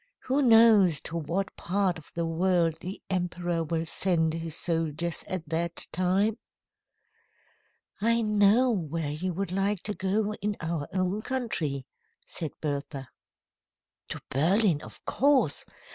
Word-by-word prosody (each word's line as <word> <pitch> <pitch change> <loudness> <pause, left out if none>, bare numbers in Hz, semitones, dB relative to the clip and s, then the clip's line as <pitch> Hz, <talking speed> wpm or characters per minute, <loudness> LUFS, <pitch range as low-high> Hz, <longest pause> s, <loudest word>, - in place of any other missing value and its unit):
Who 270 +3 +1
knows 225 - +6
to 165 - -7
what 170 +5 -2
part 185 -2 0
of 150 - -15
the 170 0 -1
world 165 0 +1
the 185 +3 -6
emperor 175 -2 -1
will 165 +1 -2
send 160 -2 +1
his 165 -1 -3
soldiers 165 0 -1
at 180 -4 -4
that 170 +1 +1
time?" 195 +5 +1 1.6
"I 230 +2 +3
know 210 +4 +4
where 165 -6 -2
you 180 +5 -2
would 195 0 -3
like 195 0 0
to 210 - -1
go 205 +2 -1
in 205 +1 -1
our 165 -3 -3
own 185 +2 -1
country," 170 - -2 0.4
said 160 -4 -5
Bertha. 140 -2 -4 1.0
"To - - -4
Berlin, 170 +3 +3
of - - -12
course. 265 - +2
180 Hz, 130 wpm, -28 LUFS, 165-205 Hz, 1.6 s, knows